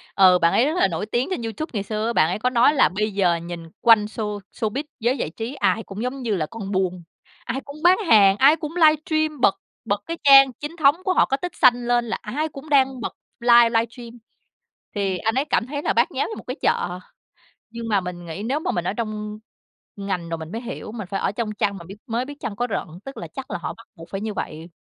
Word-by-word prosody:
Ừ, 185 -2 +6
bạn 170 0 +4
ấy 245 - +4
rất 305 - 0
là - - +4
nổi 175 +2 -3
tiếng 240 +4 -1
trên 370 - -2
YouTube 230 +8 -4
ngày 205 -3 -2
xưa 215 +1 -3
á, 235 - -1
bạn 155 - +3
ấy 180 - -2
có 250 - +1
nói 250 +3 +4
là 285 - +4
bây 210 +3 -2
giờ 185 -3 +2
nhìn 170 0 -6 0.2
quanh 225 -3 +6
show 210 -1 -4 0.2
showbiz, 225 +6 -1 0.2
giới 245 +4 +1
giải - - -2
trí 225 - -6
ai 225 -4 +1
cũng 200 +1 -8
giống 260 +2 -4
như 225 -4 -1
là 160 -5 -1
con 200 +3 -7
buôn, 185 -2 -1 0.4
ai 265 +3 -3
cũng 280 +1 -10
bán 360 +1 +6
hàng, 200 -6 +6
ai 280 +6 +6
cũng 310 +1 -7
livestream 310 -2 +2
bật 195 - +4 0.3
bật 205 -2 -1
cái 335 - -4
trang 275 -1 +8
chính 295 +7 -7
thống 290 -3 +4
của 375 - +1
họ - - +4
có 270 - -1
tích 355 +4 -6
xanh 245 -1 +4
lên 240 0 +2
là 230 - -3
ai 290 +9 -2
cũng 290 +1 -11
đang 265 -3 +3
bật - - -4 0.3
live 235 -1 +6
livestream 230 +1 -2 0.9
thì 195 -2 -1
anh 225 +6 -1
ấy 270 +2 +1
cảm 285 - 0
thấy 285 +2 -4
là - - +1
bát - - +2
nháo - - -1
như 440 - -6
một - - -9
cái 255 - -3
chợ, 180 +1 0 0.7
nhưng 230 0 -7
mà 205 -3 +2
mình 175 -1 -7
nghĩ 170 +5 -6
nếu 275 +5 0
mà - - -2
mình 175 0 -2
ở - - 0
trong 215 -1 -5 0.6
ngành 190 -4 -3
rồi 165 - -2
mình 160 0 -8
mới 225 - -4
hiểu, 240 -3 -7
mình 215 -4 -7
phải 195 - -1
ở - - 0
trong 215 0 -3
chăn 200 -1 -1
mà 170 - -11
biết 195 - -9
mới 235 +2 -1
biết 290 +1 -9
chăn 205 - -5
có 245 +3 -1
rận, - - -2 0.2
tức 270 +1 -8
là - - -6
chắc - - -8
là - - -2
họ - - -4
bắt - - -16
buộc 165 0 -12
phải 195 - -4
như 215 0 -3
vậy. 165 -3 -6
225 Hz, 260 wpm, -23 LUFS, 195-270 Hz, 0.9 s, trang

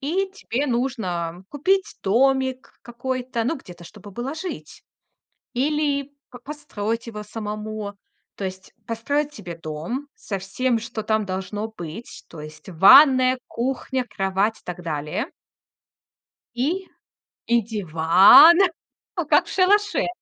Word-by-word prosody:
и 370 +8 -1
тебе 285 - -3
нужно 190 -9 -2
купить 375 +7 0
домик 260 +4 +1
какой-то, 245 0 -3
ну, 300 +6 0
где-то, 180 -9 -13
чтобы 205 +2 -13
было 245 +7 -5
жить. 360 +3 -7 0.7
Или 285 +1 0 0.2
п 245 - -11
построить 240 -5 -5
его 210 -2 -7
самому. 210 -1 -6 0.4
То 200 - -5
есть 185 0 -9
построить 285 +6 -2
себе 175 - -8
дом 165 - -5
со 195 - -5
всем, 230 +6 -1
что 230 -1 -6
там 215 -1 0
должно 190 +3 -4
быть. 195 0 -9
То 160 - -11
есть 155 +2 -11
ванная, 255 - +7
кухня, 260 +1 -2
кровать 195 +3 0
и - - -26
так 180 0 -7
далее. 155 - -3 1.3
И 335 +10 -1 0.6
и 235 0 +3
диван, 195 - +7 0.6
ну, - - -2
как - - +4
в - - -12
шалаше. 410 +2 +2
230 Hz, 125 wpm, -23 LUFS, 195-270 Hz, 1.3 s, ванная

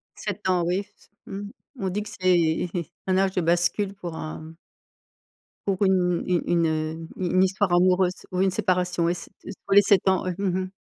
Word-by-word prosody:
7 - - -5
ans 180 -2 +2
oui, 180 +3 +1 0.2
s - - -25 0.2
mmh. 200 +1 -6 0.3
On 190 - -1
dit 205 +3 -2
que 210 - -9
c'est 175 -2 +1 0.4
un 185 0 +2
âge 190 0 +2
de 180 - 0
bascule 175 +4 +1
pour 175 -4 -7
un 155 +1 -7 1.1
pour 195 -2 0
une 180 -2 +2
une 180 -2 +2
une, 170 -1 +2
heu, 155 0 -2 0.2
une 180 -2 -2
une 185 - +6
histoire 190 0 +1
amoureuse 180 +1 +2
ou 180 - +1
une 190 -1 +3
séparation, 180 -3 0
ouais 170 - +2
c'est 170 - -9
t - - -12 0.2
tous 195 - 0
les 205 - +9
7 200 -1 +4
ans 190 - +1
ouais, 180 -2 -2
mmh 190 -2 0
mh. 185 0 -5
185 Hz, 205 wpm, -25 LUFS, 175-190 Hz, 1.1 s, les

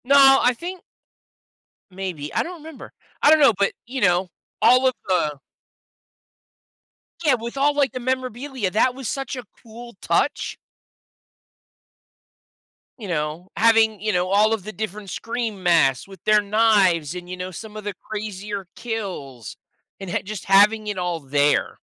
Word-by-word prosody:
No, 270 0 +7
I 250 - +3
think 350 +8 -7 1.1
Maybe. 180 -6 -6
I - - +1
don't 350 0 -8
remember. 320 -3 -11 0.3
I - - +6
don't 315 0 +6
know, 275 -6 +6
but, 200 - +2
you 255 +2 -5
know, 180 -1 +2 0.3
all 255 +1 +5
of 255 - +2
the 160 -6 0 1.9
Yeah, 290 -5 +4
with 235 +2 -6
all, 290 +2 +2
like, 285 -2 +2
the 255 - -5
memorabilia, 255 -3 -3
that 245 +5 +2
was 265 -3 -6
such 270 +3 -4
a 250 - -6 0.2
cool 235 0 -12
touch. - - 0 2.4
You 220 -5 -8
know, 160 +1 -3
having, 220 -1 +4
you 215 0 -1
know, 180 0 +1
all 210 +3 +4
of 220 -4 -3
the 215 - -7
different 210 -2 -6
Scream 230 0 -4
masks 160 -7 +3
with 195 -3 -14
their 215 0 +5
knives 200 -7 +2
and, 180 0 -8
you 185 - -6
know, 180 0 -5
some 215 +3 -9
of 215 - -7
the 205 0 -4 0.2
crazier 205 -2 -5
kills 185 - -6 0.4
and 195 -2 -7
ha - - 0
just 205 0 -7
having 210 +3 +4
it 205 -2 -3
all 175 -2 -2
there. 145 0 +1
210 Hz, 155 wpm, -22 LUFS, 180-245 Hz, 2.4 s, No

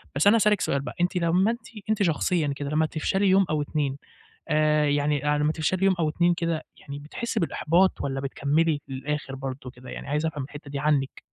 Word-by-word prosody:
بس 145 +7 +3
أنا 205 - +7
هاسألِك 210 -3 +3
سؤال 140 - 0
بقى 140 - -7
أنتِ 175 +1 +1
لما 180 +5 +3
أنتِ 235 +2 -7 0.2
أنتِ 210 -2 +2
شخصيًا 160 -2 +1
كده، 140 0 -4
لما 155 +1 +2
تفشلي 190 +6 0
يوم 190 +1 +5
أو 155 -1 0
2 145 -2 -2 0.5
آآ، 150 -1 +3
يعني، 145 0 +1
آآ، - - 0
لما 150 +1 +2
تفشلي 175 +4 0
يوم 195 - +4
أو 160 -2 +1
2 175 +3 +2
كده 165 -2 -2
يعني 140 -1 -8
بتحسي 230 - -4
بالإحباط 170 +2 +2
والّا 135 -1 -2
بتكملي 145 +3 0
للآخر 135 +1 -4
برضو 130 -1 -6
كده 125 0 -12
يعني؟ - - -7
عايز 150 +3 0
أفهم 150 -4 -3
الحتة 145 +1 -10
دي 140 - -3
عنِك. 140 -2 0
150 Hz, 205 wpm, -26 LUFS, 140-175 Hz, 0.5 s, أنا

